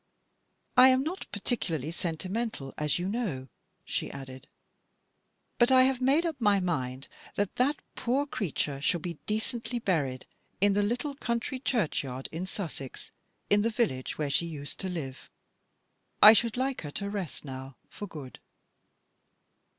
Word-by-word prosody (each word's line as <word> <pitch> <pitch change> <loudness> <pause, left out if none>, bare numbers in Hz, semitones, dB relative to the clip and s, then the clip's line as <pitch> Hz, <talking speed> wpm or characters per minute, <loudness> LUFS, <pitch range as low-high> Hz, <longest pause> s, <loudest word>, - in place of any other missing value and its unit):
u - - +11
I'm 260 0 +6
not 345 +6 -4
particularly 170 - -1
sentimental, 175 - -3
as 150 -1 +1
you 180 +1 -2
know," 190 - -2 0.4
she - - -2
added; 135 0 -9 0.5
" - - -46
but 240 +2 +5
I've 260 0 +5
made 280 +6 +4
up 325 -4 -1
my 205 -2 +5
mind 135 -7 -2 0.3
that 205 -1 -1
that 280 +4 +2
poor 260 +4 +1
creature 155 - -2
shall 175 +4 +2
be 170 -1 -5
decently 230 +2 -2
buried 150 - 0 0.3
in 200 +1 +5
the 205 - +3
little 245 +8 -1
country 250 -1 -2
churchyard 145 - -1
in 170 +4 -4
Sussex, 160 -9 -6 1.0
where 150 -2 -1
she 170 - +2
used 145 -3 -7
to 190 - -2
live. 140 -7 -5 0.9
I 215 - +12
should 230 +1 +2
like 265 +1 0
her 150 - -5
to 200 - -3
rest 190 - -4
now, 130 -1 -7
for 205 - -7
good. 145 -7 -9
190 Hz, 140 wpm, -29 LUFS, 145-240 Hz, 1.0 s, I